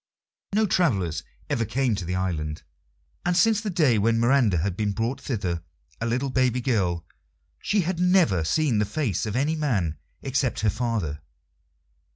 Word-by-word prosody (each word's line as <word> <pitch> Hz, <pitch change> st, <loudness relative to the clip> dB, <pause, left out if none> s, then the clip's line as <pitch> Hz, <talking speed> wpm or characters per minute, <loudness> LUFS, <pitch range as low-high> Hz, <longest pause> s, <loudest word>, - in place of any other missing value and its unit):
No 220 Hz, +1 st, +4 dB
travellers 110 Hz, -, +1 dB, 0.3 s
ever 115 Hz, -, 0 dB
came 125 Hz, +2 st, 0 dB
to 95 Hz, -4 st, -3 dB
the 90 Hz, +2 st, -2 dB
island, 80 Hz, -5 st, -2 dB, 0.6 s
and 175 Hz, 0 st, +1 dB
since 215 Hz, +2 st, +4 dB
the 215 Hz, -, -3 dB
day 150 Hz, -, +3 dB
when 115 Hz, +2 st, +2 dB
Miranda 120 Hz, -5 st, +3 dB
had 90 Hz, +3 st, -1 dB
been 105 Hz, 0 st, -1 dB
brought 115 Hz, +5 st, -2 dB
thither, 90 Hz, -9 st, -2 dB, 0.4 s
a 115 Hz, -, 0 dB
little 130 Hz, +3 st, -1 dB
baby 130 Hz, -1 st, +2 dB
girl, 95 Hz, -9 st, 0 dB, 0.6 s
she 205 Hz, -1 st, +1 dB
had 175 Hz, 0 st, -2 dB
never 180 Hz, -, +3 dB
seen 130 Hz, -, +1 dB
the 105 Hz, -, +2 dB
face 110 Hz, -, -1 dB
of 105 Hz, -, -3 dB
any 145 Hz, +5 st, +1 dB
man 100 Hz, -, -1 dB, 0.2 s
except 135 Hz, -2 st, 0 dB
her 105 Hz, -1 st, +2 dB
father. 105 Hz, -11 st, -2 dB
115 Hz, 165 wpm, -25 LUFS, 95-140 Hz, 0.6 s, No